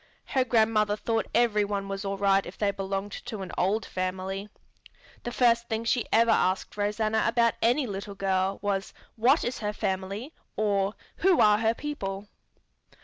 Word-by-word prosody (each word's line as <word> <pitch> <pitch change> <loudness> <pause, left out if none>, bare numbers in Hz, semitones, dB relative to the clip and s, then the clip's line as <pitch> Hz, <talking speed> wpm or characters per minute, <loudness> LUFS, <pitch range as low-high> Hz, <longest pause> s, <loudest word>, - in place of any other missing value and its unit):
Her 265 - +2
grandmother 220 -3 +2
thought 225 +1 -1
every 230 -3 +3
one 200 -1 -3
was 195 0 -4
all 195 0 -3
right 195 0 +3
if - - -10
they 205 -1 +1
belonged 195 +1 -4
to 220 -4 -5
an 185 - -7
old 200 +3 +1
family. 190 +2 -4 0.7
The 240 - -5
first 235 -1 +2
thing 225 0 -1
she 235 0 0
ever 230 0 +5
asked 185 -2 +1
Rosanna 215 +1 0
about 235 0 +3
any 250 +5 +3
little 200 -2 -6
girl 195 0 0
was 195 -1 -2 0.2
"What 255 +7 +3
is 245 - -3
her 210 -1 -2
family?" 195 - -3 0.2
or 200 -1 0 0.2
"Who 370 -1 +3
are 210 0 +5
her 225 0 +2
people?" 205 -10 -5
210 Hz, 165 wpm, -27 LUFS, 195-230 Hz, 0.7 s, ever